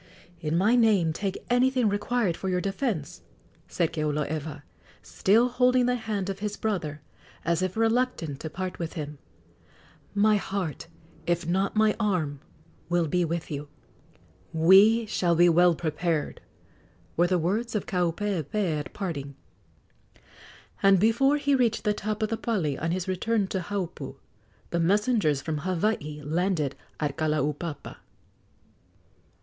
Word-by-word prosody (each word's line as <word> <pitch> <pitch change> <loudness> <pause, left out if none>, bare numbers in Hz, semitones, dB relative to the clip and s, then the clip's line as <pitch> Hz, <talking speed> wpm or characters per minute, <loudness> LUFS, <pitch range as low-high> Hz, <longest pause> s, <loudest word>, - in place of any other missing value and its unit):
"In 160 0 -1
my 210 +7 +4
name 205 -9 +3
take 195 +3 -4
anything 250 0 +3
required 205 -2 0
for 190 - -4
your 180 -1 +1
defence," 195 - -3 0.5
said 170 -3 -1
Keoloewa, 150 -1 -2 0.4
still 225 +5 +3
holding 250 0 +3
the 250 - +2
hand 220 -5 -3
of 195 -1 -4
his 210 0 -3
brother, 165 -9 -2 0.4
as 170 0 +1
if 185 +2 -2
reluctant 225 - 0
to 160 - -5
part 185 +3 -5
with 165 -2 -4
him; 150 -2 -6 1.0
"my 210 +1 +4
heart, 190 -6 -4 0.4
if 175 0 0
not 190 +5 0
my 215 0 +3
arm, 170 -10 0 0.5
will 175 -1 +2
be 180 +4 +1
with 170 0 -3
you!" 145 0 -4 0.8
"We 195 +8 +6
shall 175 -5 +1
be 175 +1 +6
well 175 +1 +5
prepared," 160 -1 -2 0.7
were 175 +1 +3
the 180 0 +2
words 215 +8 -1
of 210 - -1
Kaupeepee 180 -1 -1
at 145 - -7
parting; 145 -8 -4 1.5
and 195 -1 +5
before 235 +8 +3
he 285 -1 +1
reached 240 -4 +2
the 210 -2 +2
top 215 +1 -3
of 215 - 0
the 225 - -1
pali 180 - -1
on 165 +5 -3
his 180 +2 -2
return 200 +3 0
to 190 - -1
Haupu, 190 -1 -5 0.6
the 170 - 0
messengers 190 - +2
from 155 -2 -2
Hawaii 165 -3 -2
landed 160 -3 0 0.2
at 145 -2 -2
Kalaupapa. 150 0 -2
185 Hz, 140 wpm, -27 LUFS, 160-215 Hz, 1.5 s, We